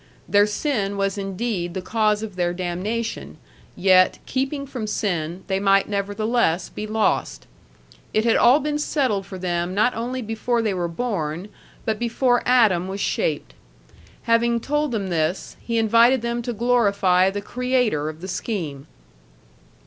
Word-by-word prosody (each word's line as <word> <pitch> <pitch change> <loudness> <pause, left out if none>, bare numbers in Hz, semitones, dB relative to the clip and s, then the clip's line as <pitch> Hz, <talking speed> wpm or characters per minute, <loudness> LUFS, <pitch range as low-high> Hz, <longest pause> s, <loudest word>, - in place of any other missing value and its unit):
Their 205 0 +4
sin 210 -3 -1
was 195 0 0
indeed 195 -3 -3
the 190 - -2
cause 215 +1 +1
of 210 -4 -7
their 175 -1 0
damnation, 180 - -3 0.4
yet, 185 0 +4
keeping 275 +2 -2
from 250 -5 -5
sin, 180 -4 -2
they 190 -1 -1
might 195 0 +3
nevertheless 205 -2 0
be 215 - -6
lost. 220 0 0 0.7
It 215 - +1
had 230 - +4
all 250 +5 +6
been 295 0 -2
settled 255 - 0
for 190 - -7
them 175 0 -2
not 215 +5 +3
only 250 +2 -3
before 225 +2 -1
they 215 -3 0
were 175 -2 -1
born, 170 -3 -3 0.4
but 220 -1 -1
before 245 +1 +1
Adam 215 -8 +4
was 195 +1 -5
shaped. - - -1 0.7
Having 235 0 +2
told 295 +2 -1
them 200 -5 -2
this, 165 +1 -1
he 230 -1 -2
invited 230 +3 +4
them 235 0 -1
to 240 +1 -3
glorify 200 -6 +3
the 200 +1 -4
Creator 245 - 0
of 155 +1 -9
the 185 - -6
scheme. 165 - -4
210 Hz, 150 wpm, -22 LUFS, 185-235 Hz, 0.7 s, all